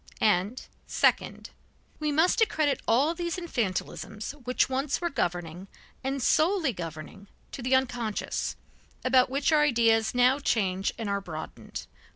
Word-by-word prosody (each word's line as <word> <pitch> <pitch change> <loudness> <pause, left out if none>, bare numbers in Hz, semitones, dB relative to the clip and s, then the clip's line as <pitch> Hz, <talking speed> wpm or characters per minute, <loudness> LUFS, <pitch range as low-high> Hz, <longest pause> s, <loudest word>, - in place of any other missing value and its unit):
And 210 +3 +1 0.2
second: - - +1 0.5
We 300 -1 0
must 325 +9 +3
accredit 305 -10 +2
all 270 +8 +3
these 340 -1 -3
infantilisms 220 - -3 0.2
which 250 - +2
once 265 +2 -1
were 345 -1 -2
governing, 175 - -3 0.4
and 270 -1 -2
solely 320 - +3
governing, 170 +3 -8 0.2
to - - -7
the 255 +2 +2
unconscious, 245 -5 -1 0.5
about 255 -1 +4
which 275 +4 +1
our 305 -1 +5
ideas 230 -5 +3
now 250 +3 +4
change 195 -7 0
and 225 -3 -4
are 200 0 -1
broadened. 160 -5 -7
250 Hz, 135 wpm, -28 LUFS, 200-290 Hz, 0.5 s, our